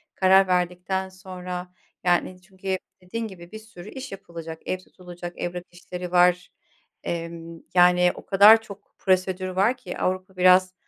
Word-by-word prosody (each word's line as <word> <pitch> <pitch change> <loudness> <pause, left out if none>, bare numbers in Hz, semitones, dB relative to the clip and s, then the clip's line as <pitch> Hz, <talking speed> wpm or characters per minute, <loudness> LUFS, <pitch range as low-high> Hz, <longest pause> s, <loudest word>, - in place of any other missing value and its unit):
karar 190 0 +5
verdikten 180 +1 -1
sonra, 180 -1 -8 0.3
yani, 180 +1 +1
çünkü 190 0 -4 0.2
dediğin 225 +5 -5
gibi, 175 -2 -12
bir 220 - -8
sürü 215 -3 -12
iş 265 0 -8
yapılacak; 165 -4 -9
ev 185 - -1
tutulacak, 175 -1 -11
evrak 175 0 -4
işleri, 180 0 -8
var. 180 0 +3 0.5
Emm, 165 -1 -6
yani, 180 0 +5
o - - -12
kadar 210 +3 +7
çok 210 -3 -13
prosedür 185 0 0
var 200 +7 +1
ki, 180 - -8
Avrupa 185 0 -2
biraz 185 0 +5
185 Hz, 145 wpm, -24 LUFS, 180-190 Hz, 0.5 s, kadar